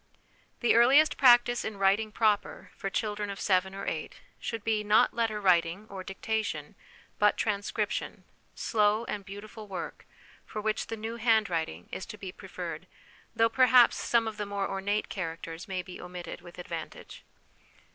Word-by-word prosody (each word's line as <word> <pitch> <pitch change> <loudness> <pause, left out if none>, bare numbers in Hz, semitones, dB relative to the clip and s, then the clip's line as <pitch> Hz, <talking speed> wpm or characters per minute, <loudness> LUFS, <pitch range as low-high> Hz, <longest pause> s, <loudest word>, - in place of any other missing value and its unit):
The 240 - +4
earliest 265 +7 +6
practice 240 -2 +5
in 215 -2 -5
writing 200 +3 +2
proper 210 -1 0
for 195 - -4
children 210 0 -2
of 200 - -6
seven 190 0 +1
or 195 - -5
eight 155 - -4 0.2
should 230 -3 -4
be, 220 -2 +1
not 210 +1 +4
letter 225 -2 0
writing 180 0 +2
or 190 -1 -6
dictation, 195 -5 -3 0.5
but 210 0 +4
transcription, 205 -2 -2 0.3
slow 215 0 +2
and 205 -1 -4
beautiful 210 +2 -9
work, 190 -2 -7 0.4
for 215 - -6
which 215 +1 -1
the 225 - -5
New 225 +2 -5
Hand 220 -3 +3
writing 160 - -3
is 190 - -5
to 210 - -8
be 190 -3 -7
preferred, - - -7 0.5
though 225 - +5
perhaps 250 0 +6
some 230 -1 +2
of 220 -1 -5
the 210 -2 -3
more 200 -1 -2
ornate 200 +2 -1
characters 165 -2 -5
may 185 -2 -3
be 180 0 -10
omitted 180 0 -7
with 175 -1 -13
advantage. 170 -2 -7
210 Hz, 160 wpm, -29 LUFS, 190-220 Hz, 0.5 s, earliest